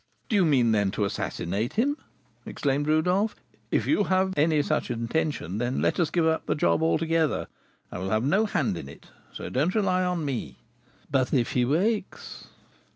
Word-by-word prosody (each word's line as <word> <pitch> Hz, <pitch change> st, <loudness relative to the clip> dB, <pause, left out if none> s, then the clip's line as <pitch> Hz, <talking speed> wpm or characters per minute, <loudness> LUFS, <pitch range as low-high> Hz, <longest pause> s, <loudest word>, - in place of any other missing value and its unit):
"Do 220 Hz, -, +1 dB
you 195 Hz, -3 st, +4 dB
mean, 130 Hz, -7 st, +3 dB
then, 105 Hz, -2 st, +2 dB
to 105 Hz, -, +2 dB
assassinate 100 Hz, +3 st, -3 dB
him?" 270 Hz, +6 st, +1 dB, 0.5 s
exclaimed 145 Hz, +1 st, -1 dB
Rodolph. 180 Hz, +7 st, +2 dB, 0.3 s
"If -, -, +1 dB
you 210 Hz, -9 st, +2 dB
have 190 Hz, 0 st, +1 dB
any 150 Hz, 0 st, +3 dB
such 155 Hz, -2 st, -1 dB
intention, 115 Hz, -, -2 dB
let 120 Hz, +8 st, 0 dB
us 170 Hz, -, +2 dB
give 170 Hz, -2 st, +1 dB
up 160 Hz, 0 st, 0 dB
the -, -, +1 dB
job 150 Hz, -, +2 dB
altogether; 160 Hz, -1 st, +1 dB, 0.5 s
I -, -, -5 dB
will 95 Hz, +1 st, -3 dB
have 110 Hz, +3 st, +1 dB
no 195 Hz, +11 st, +2 dB
hand 115 Hz, -, 0 dB
in 70 Hz, -, -8 dB
it, -, -, -15 dB, 0.2 s
so -, -, -7 dB
don't 155 Hz, -, 0 dB
rely 185 Hz, -4 st, +2 dB
on 180 Hz, -3 st, -1 dB
me 135 Hz, -5 st, -4 dB, 0.3 s
" 125 Hz, +3 st, -31 dB
"But 130 Hz, -2 st, +1 dB
if 120 Hz, -3 st, +1 dB
he 125 Hz, -1 st, +2 dB
wakes?" 190 Hz, -, -2 dB
155 Hz, 180 wpm, -26 LUFS, 120-180 Hz, 0.5 s, you